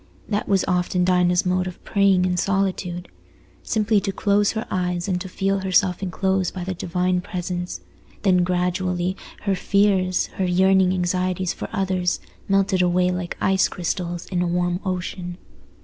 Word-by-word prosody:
That 205 -1 -2
was 195 -2 +3
often 180 -1 +1
Dinah's 180 -1 +3
mode 185 0 +1
of 180 - -9
praying 195 -2 +3
in 180 -1 +1
solitude. 185 -2 -1 0.5
Simply 215 -1 +1
to 195 - -2
close 200 +1 +2
her 220 - -3
eyes 180 -1 -1
and 180 -2 -1
to 190 - -6
feel 195 +1 0
herself 185 -1 +2
enclosed 190 -1 -1
by 185 - -4
the 190 +1 -3
Divine 180 +1 0
Presence; 180 -2 -4 0.4
then 180 -3 +4
gradually 180 0 0 0.3
her 200 - +1
fears, 190 -2 +2 0.2
her - - +2
yearning 190 +1 +4
anxieties 185 0 0
for - - -6
others, 185 - 0 0.3
melted 195 -1 +2
away 180 0 +2
like 180 -1 -4
ice 190 -1 +3
crystals 175 -1 -3
in 180 -2 0
a 180 - +1
warm 175 0 0
ocean. 180 -1 -4
185 Hz, 155 wpm, -23 LUFS, 180-195 Hz, 0.5 s, then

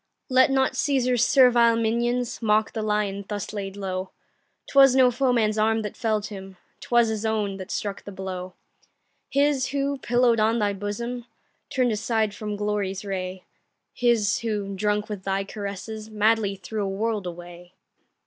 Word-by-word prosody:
Let 260 0 +5
not 265 -1 +2
Cæsar's 255 -3 +1
servile 240 -3 +5
minions 235 +2 0
Mock 215 -1 +2
the 220 - -3
lion 210 -2 -1
thus 205 -1 -4
laid 200 -1 -5
low; 190 -1 -4 0.6
'Twas 270 -2 +6
no 255 -1 +6
foeman's 235 -4 +1
arm 220 +1 +2
that 210 - -5
fell'd 215 -2 -1
him, 195 -3 -9 0.2
'Twas 235 -1 +2
his 220 -1 -3
own 210 -3 -1
that 185 -1 -8
struck 200 -1 -4
the 200 - -8
blow; 185 -1 -6 0.7
His 280 -2 +2
who, 280 0 -1
pillow'd 240 -2 +2
on 220 +2 +3
thy 205 -2 +1
bosom, 235 +5 -5 0.4
Turn'd 250 -2 +1
aside 220 -1 0
from 210 0 -5
glory's 205 -1 -2
ray, 185 -1 -4 0.5
His 235 -5 +2
who, 210 -3 -3
drunk 210 +1 0
with 210 -3 -5
thy 195 0 -1
caresses, 210 +2 -6
Madly 215 -1 +2
threw 200 +3 -5
a 195 - -2
world 210 0 -2
away. 175 +1 -10
215 Hz, 155 wpm, -25 LUFS, 200-240 Hz, 0.7 s, Twas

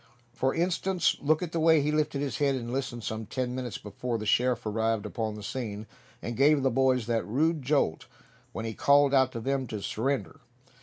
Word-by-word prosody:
For 130 +1 0
instance, 180 +1 +1
look 155 +4 +2
at 170 - -4
the 170 - -1
way 160 0 +5
he 150 - +1
lifted 150 -2 0
his 140 -2 -3
head 140 -2 +2
to 120 -2 -5
listen 125 -3 -3
some 110 +1 -4
ten 125 0 -3
minutes 125 -3 -4
before 115 +3 -4
the 110 - -5
sheriff 125 +2 +2
arrived 110 0 0
upon 110 -2 -3
the 105 - -9
scene, 110 -2 -5 0.4
and 120 - -4
gave 140 +2 +4
the 135 - +2
boys 130 -1 +2
that 115 -1 0
rude 155 +7 0
jolt 130 - 0 0.4
when 110 - -5
he 110 - -3
called 140 +3 +4
out 130 -1 +4
to 115 - -4
them 135 +2 -1
to 105 -1 -5
surrender. 110 -4 -2
130 Hz, 205 wpm, -28 LUFS, 115-140 Hz, 0.4 s, way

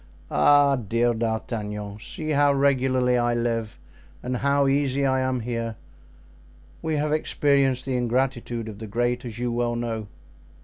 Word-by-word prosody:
"Ah! 140 - +5
dear 120 +1 +1
D'Artagnan! 110 -2 -3
see 155 +7 -5
how 145 -1 +4
regularly 130 -2 +2
I 120 0 +1
live 115 -2 -2 0.5
and 125 0 -2
how 140 +2 +2
easy 140 0 +1
I 130 -1 +2
am 130 -1 0
here. 115 -1 -3 1.1
We 160 -1 -1
have 150 0 0
experienced 140 -4 +1
the 130 -1 -1
ingratitude 120 -1 -1
of 105 -2 -8
'the 110 - -7
great,' 120 +3 -1
as 115 -2 -7
you 120 0 -2
well 120 0 0
know." 115 -2 -3
125 Hz, 145 wpm, -25 LUFS, 115-135 Hz, 1.1 s, Ah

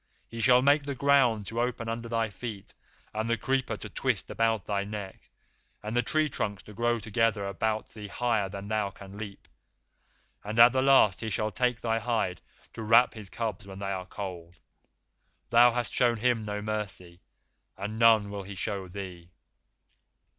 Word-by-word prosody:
He 115 0 -6
shall 125 +1 +5
make 145 +2 +5
the 140 -1 -4
ground 125 -6 +3
to 115 +4 -2
open 120 -1 -2
under 115 +1 -4
thy 115 -2 0
feet, 100 0 -7 0.4
and 110 +1 -2
the 115 - +2
creeper 130 +3 -1
to - - -8
twist - - -1
about 115 -3 +1
thy 100 -1 -1
neck, 100 -2 -8 0.5
and 105 +2 -4
the 120 - +4
tree 155 +4 +1
trunks 100 -8 -3
to 105 - -12
grow 120 +2 +1
together 110 -1 0
about 110 +2 -2
thee 105 -1 -9
higher 110 -2 0
than 100 +1 -7
thou 105 -2 0
canst 100 +1 -12
leap, 100 -2 -8 1.0
and 105 +2 -5
at 120 +1 +9
the 130 - +2
last 130 -8 +5
he 110 - -3
shall 110 +1 -1
take 125 +4 0
thy 115 -1 0
hide 110 -7 -1 0.3
to 115 - -7
wrap 115 +3 +5
his 105 -4 -7
cubs 105 -3 -4
when 95 -1 -9
they 100 0 -3
are 95 -1 -4
cold. 90 -4 -7 1.0
Thou 120 +1 +7
hast 120 -1 -2
shown 120 -1 +3
him 115 -1 +1
no 105 0 -4
mercy, 95 -5 -5 0.6
and 105 +3 -5
none 110 -3 +5
will 100 -1 -4
he 100 +1 -9
show 95 +1 -3
thee. 90 -2 -8
110 Hz, 180 wpm, -28 LUFS, 100-120 Hz, 1.0 s, at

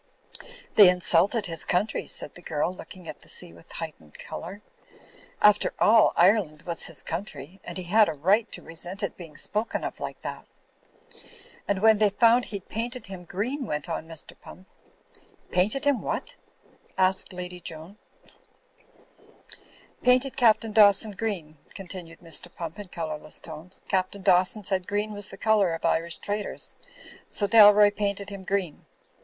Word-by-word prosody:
"They 205 -4 +10
insulted 180 +4 +3
his 165 -3 -5
country," 190 +5 -1
said - - -5
the 175 - -12
girl, 160 +1 -1
looking 185 -1 -11
at - - -8
the - - -17
sea 85 - -8
with 85 - -17
a - - -12
heightened 155 - -8
colour. 200 +4 -8 0.8
"After 210 0 +4
all, 220 +1 +5
Ire 200 +6 +5
land 155 -3 -13
was 170 -1 -2
his 165 - -6
country; 175 0 -6
and - - -7
he 185 - -4
had 210 +4 +4
a - - -2
right 195 +10 +2
to - - -8
resent 175 +5 0
it 200 - -2
being 165 -5 -11
spoken 215 +2 -2
of - - -5
like - - -6
that." - - -6 1.2
"And 200 0 -1
when 220 -1 +6
they 210 -1 +5
foimd 235 +4 +4
he'd 200 -3 -7
painted 240 +3 -4
him 180 -1 -9
green," 245 +9 -3
went 150 -5 -3
on 160 -1 -4
Mr. 165 -2 -4
Pump. 185 +1 -13 0.8
"Painted 215 +10 +1
him 285 -3 +2
what?" - - -4 0.6
asked 190 0 +2
Lady 180 0 -6
Joan, 165 +4 -9 2.0
"Painted 255 +1 +3
Captain 225 -3 +3
Dawson 210 0 +6
green," 185 -8 -4 0.2
continued 180 -3 -9
Mr. 170 +1 -4
Pump 165 +3 -7
in 205 - -7
colourless 155 -3 -5
tones. 165 +3 -8
"Captain 190 0 -1
Dawson 185 +4 +3
said 185 -2 0
green 205 +1 -1
was 205 -1 -5
the 195 - -10
colour 205 -5 +2
of 165 - -6
Irish 170 +1 0
traitors, 205 0 -4 0.5
so 205 - -1
Dalroy 205 -1 +7
paint 200 -1 -1
ed 200 0 -8
him 200 -1 -7
green. 190 -4 -3
190 Hz, 160 wpm, -26 LUFS, 170-210 Hz, 2.0 s, They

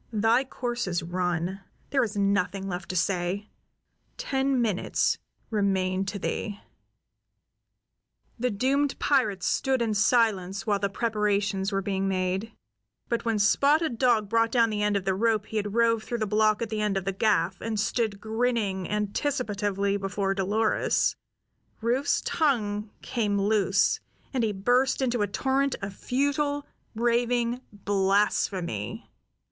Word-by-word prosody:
Thy 225 +4 +3
course 245 -4 -3
is 175 -2 -1
run. 180 +1 -2 0.3
There 270 -2 +3
is 210 -2 -3
nothing 200 -1 0
left 180 -2 -5
to 185 - -3
say. 180 +3 -1 0.7
Ten 270 -1 0
minutes 215 -6 +1 0.3
remain 195 -2 +1
to 200 +1 -4
thee." 205 +1 -3 1.8
The 250 +1 +1
doomed 270 +6 +1
pirate 215 -10 +1
stood 265 -1 +1
in 230 -2 0
silence 210 -3 +2
while 205 -2 +1
the 200 0 0
preparations 205 -2 0
were 195 0 -1
being 195 0 -1
made; 190 +3 -1 0.6
but 235 0 -1
when 225 -2 +1
Spotted 280 +5 +3
Dog 235 -5 +3
brought 230 +2 +2
down 230 -2 +3
the 210 -1 -2
end 210 -1 +2
of 195 - -4
the 190 - +2
rope 215 +1 +1
he 220 - -4
had 205 0 -2
rove 230 -1 +3
through 240 - -3
the 220 - -1
block 215 +1 +2
at 230 - -5
the 215 -1 -1
end 210 -2 +1
of 190 - -3
the 195 - 0
gaff, 190 -3 +1
and 220 -1 -2
stood 220 -2 0
grinning 220 -4 -1
anticipatively 205 -2 -1
before 195 0 -1
Dolores, 205 +3 +1 0.6
Rufe's 245 +5 +1
tongue 215 -9 0
came 205 -4 0
loose, 200 -1 +2 0.3
and 255 -3 +1
he 220 - +1
burst 245 +7 +2
into 245 -4 0
a 205 - +2
torrent 270 +6 0
of 195 0 -4
futile, 285 +4 0 0.3
raving 240 +1 +1
blasphemy. 195 - 0
210 Hz, 140 wpm, -27 LUFS, 195-235 Hz, 1.8 s, Thy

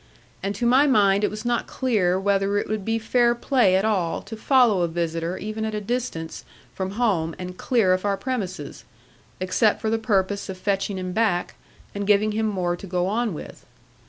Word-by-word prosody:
And 200 +1 -2
to 240 - -2
my 260 +5 +5
mind 200 -6 +4
it - - +3
was 215 +1 -7
not 240 0 0
clear 200 -8 +1
whether 200 +1 +1
it - - -1
would 215 -2 -2
be 225 +3 0
fair 235 +2 +2
play 240 -6 +3
at 190 +2 +2
all 190 -6 0
to 225 - -8
follow 230 -4 +3
a 170 - +2
visitor 165 +1 -2
even 215 +1 -4
at 220 0 -2
a - - -1
distance 210 -7 -4 0.3
from 190 0 -4
home 195 -9 0
and 180 0 -7
clear 215 -4 +2
of 185 - -1
our 200 -1 0
premises; 190 - -4 0.6
except 185 +4 +2
for 220 - -1
the 225 - +1
purpose 200 -2 0
of 190 - -5
fetching 195 0 -1
him 185 -1 -4
back, 210 -5 0 0.4
and 200 0 -4
giving 210 +1 +3
him 220 +1 0
more 180 -4 -1
to 195 - -10
go 180 0 0
on 215 0 -1
with. - - -10
200 Hz, 200 wpm, -24 LUFS, 185-225 Hz, 0.6 s, my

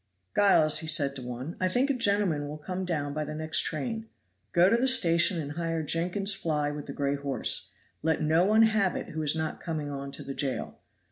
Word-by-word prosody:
"Giles," 190 -7 +5
said 145 -3 +1
he - - -16
to - - -7
one, 125 +6 -6
"I 185 - +2
think 250 +9 +2
a - - +1
gentleman 200 - +1
will 150 +1 -6
come 185 +4 -4
down 145 -5 -2
by 155 +1 -2
the 150 +1 -6
next 155 0 -1
train. 225 +7 -3 0.4
Go 175 +1 +5
to 200 - +4
the 245 +3 +2
station 170 -6 +4
and 145 -2 -4
hire 165 0 -2
Jenkyns's 180 +6 0
fly 150 -6 -1
with 145 -1 -7
the - - -5
gray 140 0 -1
horse. 140 -1 -2 0.3
Let 160 0 +1
no 160 +3 +3
one 215 +3 +5
have 215 -4 +2
it - - -5
who 155 - -4
is 150 0 +2
not 160 -1 -3
coming 155 -4 -3
on 140 0 -5
to - - -6
the 135 - -5
jail. 135 -2 -3
160 Hz, 220 wpm, -28 LUFS, 145-190 Hz, 0.4 s, Giles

